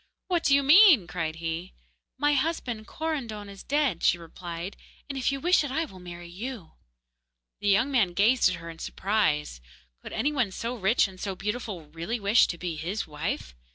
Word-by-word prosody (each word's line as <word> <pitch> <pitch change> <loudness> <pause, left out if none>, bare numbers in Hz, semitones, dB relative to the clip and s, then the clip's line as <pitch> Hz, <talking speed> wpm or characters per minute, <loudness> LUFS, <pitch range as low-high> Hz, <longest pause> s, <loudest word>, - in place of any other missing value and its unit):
'What 350 -2 +2
do 275 - +5
you 280 - +3
mean?' 310 - +8
cried 165 -3 -3
he. 165 +2 -4 0.4
'My 295 0 +2
husband, 260 -7 -1
Korandon, 245 -10 -4
is 195 -1 -10
dead,' 280 - 0
she 175 - +4
replied, 170 +2 -7 0.3
'and 280 - -5
if 265 0 0
you 275 - -3
wish 350 +2 +4
it, 290 - -3
I 320 +5 0
will 190 -11 -13
marry 175 -1 -9
you.' 205 +2 -7 0.9
The 205 0 0
young 220 +8 +3
man 210 -10 +2
gazed 220 +4 +4
at 180 - -2
her 165 0 -8
in 165 - -13
surprise. 150 - 0 0.4
Could - - -9
any 295 - +1
one 255 -8 +1
so 230 +5 -4
rich 215 +1 +3
and 185 -1 -13
so 195 -1 -3
beautiful 210 -3 -4
really 170 +9 -3
wish 205 +3 +5
to 170 - -4
be 170 -2 -4
his 180 +8 -3
wife? 150 - -4
205 Hz, 190 wpm, -27 LUFS, 175-265 Hz, 0.9 s, mean